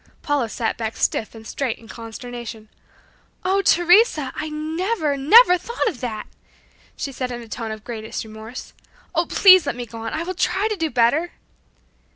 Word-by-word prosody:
Paula 285 -6 0
sat 225 0 -2
back 220 -1 -3
stiff 225 - -1
and 220 0 -11
straight 250 +1 -3
in 225 - -16
consternation. 230 -1 -8 0.8
"Oh, 385 +2 +2
Teresa, 350 - +4
I 310 - -4
never, 315 +2 -1
never 360 - +6
thought 470 +7 -2
of 270 - -2
that!" 220 -4 -4 0.7
she 275 - -4
said 255 -1 -4
in 240 -1 -6
a - - -13
tone 225 0 -5
of 215 0 -7
greatest 220 -2 -5
remorse, 220 +2 -9 0.4
"Oh, 335 0 +1
please 370 -5 +7
let 280 - -1
me 245 0 -5
go 230 0 -10
on! 225 0 -5
I 320 - -2
will 370 +2 -4
try 380 +3 0
to 425 - -1
do 325 -4 -1
better!" 255 +8 +2
265 Hz, 180 wpm, -22 LUFS, 225-345 Hz, 0.8 s, please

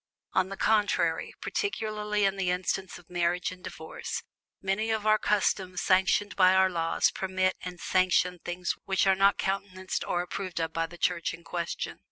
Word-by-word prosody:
On 185 0 +2
the 195 - -6
contrary, 215 -2 +1
particularly 210 - -1
in 195 0 +2
the 190 -2 -1
instance 185 +1 -1
of 175 - -17
Marriage 175 0 0
and 180 -1 -12
Divorce, 160 +3 -6 0.4
many 195 +3 -1
of 220 -1 0
our 215 0 +5
customs 190 -3 +1
sanctioned 190 +2 +3
by 185 -1 +6
our 190 0 +4
laws 165 -1 +1
permit 185 0 0
and 180 -1 -7
sanction 180 -1 +2
things 175 0 -2
which 190 0 +2
are 195 - +5
not 195 +1 +4
countenanced 190 -1 -2
or 175 - -1
approved 185 -1 -4
of 165 0 -2
by 165 0 0
the 175 +1 -12
Church 170 -1 0
in 170 - -18
question. 170 0 -4
185 Hz, 175 wpm, -28 LUFS, 180-195 Hz, 0.4 s, by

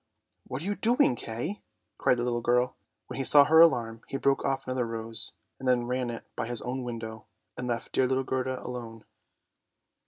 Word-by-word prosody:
" - - -32
What 130 +4 -5
are - - -6
you 205 - 0
doing, 225 - +2
Kay? 120 - -5 0.2
" - - -52
cried 125 - +3
the 120 - -1
little 120 -1 -1
girl. 125 +1 +1 0.3
When - - -8
he 135 - -1
saw 145 +2 +9
her 160 +2 +5
alarm, 115 -9 +4
he 135 - -3
broke 135 0 +1
off 135 0 -1
another 130 -2 -1
rose, 115 0 -2 0.3
and 130 - -5
then 125 -1 +3
ran 125 0 -2
in, 115 - -5
by 115 - -3
his 120 -1 -3
own 130 +2 -3
window, 115 -2 -7 0.3
and 125 - -5
left 120 -1 -3
dear 130 - +2
little 130 +1 0
Gerda 130 0 -2
alone. 115 -3 -7
125 Hz, 210 wpm, -28 LUFS, 120-135 Hz, 0.3 s, saw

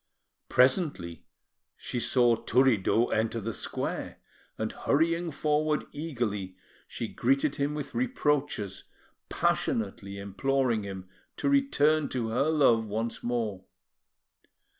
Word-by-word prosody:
Presently, 130 - +2 0.5
she 125 - -4
saw 120 0 +4
Turiddu 120 -1 +2
enter 110 +1 0
the 115 +1 -4
square, - - -3 0.4
and, 110 0 -2
hurrying 165 +3 +1
forward 150 0 0
eagerly, 115 - -3 0.3
she - - -4
greeted 135 +3 +1
him 145 +1 -1
with 150 -2 -5
reproaches, 145 - -1 0.4
passionately 100 -2 -1
imploring 120 +4 0
him 95 -2 -7 0.3
to - - 0
return 155 - +3
to 120 -3 -2
her 130 +7 +1
love 120 -8 +3
once 110 +3 -3
more. 110 -6 -2
125 Hz, 105 wpm, -28 LUFS, 110-150 Hz, 0.5 s, saw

